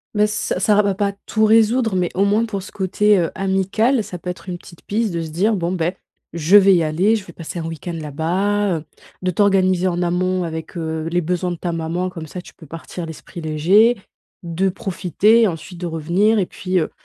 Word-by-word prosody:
Mais, 210 Hz, 0 st, +4 dB
ç 210 Hz, -, -2 dB
ça 205 Hz, +2 st, +3 dB
ra 210 Hz, -, +5 dB
va 200 Hz, -1 st, 0 dB
pas 200 Hz, 0 st, 0 dB
tout 220 Hz, -1 st, 0 dB
résoudre 225 Hz, 0 st, +4 dB
mais 180 Hz, -1 st, +1 dB
au 195 Hz, -, +3 dB
moins 210 Hz, +3 st, +2 dB
pour 200 Hz, -4 st, -4 dB
ce -, -, -11 dB
côté, 200 Hz, +2 st, +2 dB
heu, 165 Hz, -2 st, 0 dB
amical, 195 Hz, +6 st, +1 dB
ça 180 Hz, -, -7 dB
peut 180 Hz, -, -7 dB
être 180 Hz, 0 st, -7 dB
une 180 Hz, -1 st, -4 dB
petite 170 Hz, -1 st, -16 dB
piste 215 Hz, -1 st, -1 dB
de 170 Hz, -, -2 dB
se 165 Hz, -, -5 dB
dire: 205 Hz, +7 st, +1 dB
«Bon 175 Hz, 0 st, -1 dB
beh, 175 Hz, +1 st, -1 dB, 0.3 s
je 170 Hz, +4 st, +2 dB
vais 195 Hz, -1 st, +8 dB
y 170 Hz, -, +3 dB
aller, 185 Hz, +9 st, +2 dB
je 195 Hz, -, -8 dB
vais 170 Hz, -, -12 dB
passer 165 Hz, +1 st, -7 dB
un 165 Hz, -, -4 dB
week-end 165 Hz, +1 st, -5 dB
là-bas», 180 Hz, +6 st, 0 dB
heu, 150 Hz, -, -14 dB, 0.4 s
de 185 Hz, -, +1 dB
t'organiser 185 Hz, -1 st, +2 dB
en 175 Hz, 0 st, -2 dB
amont 180 Hz, +1 st, 0 dB
avec, 160 Hz, +1 st, -6 dB
heu, 160 Hz, -1 st, -3 dB
les 175 Hz, -, +2 dB
besoins 180 Hz, +2 st, -1 dB
de 175 Hz, -, -4 dB
ta 175 Hz, 0 st, -3 dB
maman 165 Hz, +3 st, -2 dB
comme 165 Hz, -3 st, -8 dB
ça 180 Hz, +4 st, -7 dB
tu -, -, -15 dB
peux 160 Hz, -, -15 dB
partir 165 Hz, +3 st, -7 dB
l'esprit 160 Hz, +2 st, -9 dB
léger. 185 Hz, +10 st, +3 dB, 0.5 s
De 175 Hz, +3 st, 0 dB
profiter, 200 Hz, +4 st, +2 dB
ensuite 170 Hz, 0 st, -6 dB
de -, -, -2 dB
revenir 175 Hz, +7 st, +1 dB
et 190 Hz, -, +1 dB
puis, 185 Hz, +1 st, -3 dB
heu, 155 Hz, -, -2 dB
185 Hz, 225 wpm, -20 LUFS, 170-205 Hz, 0.5 s, vais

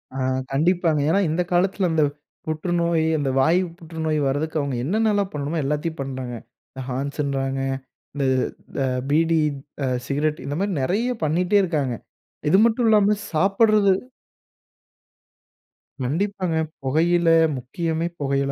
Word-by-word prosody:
ஆ -, -, -4 dB, 0.4 s
கண்டிப்பாங்க. 165 Hz, 0 st, +2 dB
ஏன்னா 195 Hz, -, +3 dB
இந்த 165 Hz, +3 st, 0 dB
காலத்துல 185 Hz, +1 st, +2 dB
அந்த 155 Hz, -2 st, +3 dB, 0.4 s
புற்றுநோய், 170 Hz, 0 st, 0 dB
அந்த 140 Hz, -2 st, -1 dB
வாய் 165 Hz, +6 st, +4 dB, 0.2 s
புற்றுநோய் 160 Hz, -2 st, -2 dB
வரதுக்கு 155 Hz, +3 st, -1 dB
அவுங்க 140 Hz, -3 st, -2 dB
என்னென்ன 215 Hz, +5 st, +2 dB
எல்லாம் 200 Hz, -1 st, 0 dB
பண்ணணுமோ, 150 Hz, +3 st, -2 dB
எல்லாத்தயும் 150 Hz, +2 st, -2 dB
பண்றாங்க. 130 Hz, -2 st, -5 dB, 0.4 s
இந்த 130 Hz, -, -8 dB
ஹான்ஸுன்றாங்க, 135 Hz, 0 st, -2 dB, 0.5 s
இந்த 140 Hz, -1 st, 0 dB, 0.5 s
த -, -, 0 dB, 0.3 s
பீடி 165 Hz, +2 st, +3 dB, 0.5 s
அ -, -, 0 dB, 0.2 s
சிகரெட் 150 Hz, +1 st, -1 dB
இந்த 145 Hz, +1 st, -3 dB
மாரி 200 Hz, 0 st, 0 dB
நிறையா 225 Hz, -, 0 dB
பண்ணிட்டே 180 Hz, +6 st, +2 dB
இருக்காங்க. 145 Hz, -8 st, -1 dB, 0.5 s
இது 190 Hz, -, +5 dB
மட்டும் 235 Hz, 0 st, +2 dB
இல்லாம, 210 Hz, -1 st, +4 dB, 0.2 s
சாப்புட்றது 200 Hz, +3 st, +4 dB, 2.1 s
கண்டிப்பாங்க. 185 Hz, +3 st, -1 dB, 0.3 s
புகையில, 165 Hz, +5 st, +2 dB, 0.3 s
முக்கியமே 160 Hz, +6 st, -2 dB
புகையில 140 Hz, 0 st, 0 dB
160 Hz, 120 wpm, -23 LUFS, 140-185 Hz, 2.1 s, இது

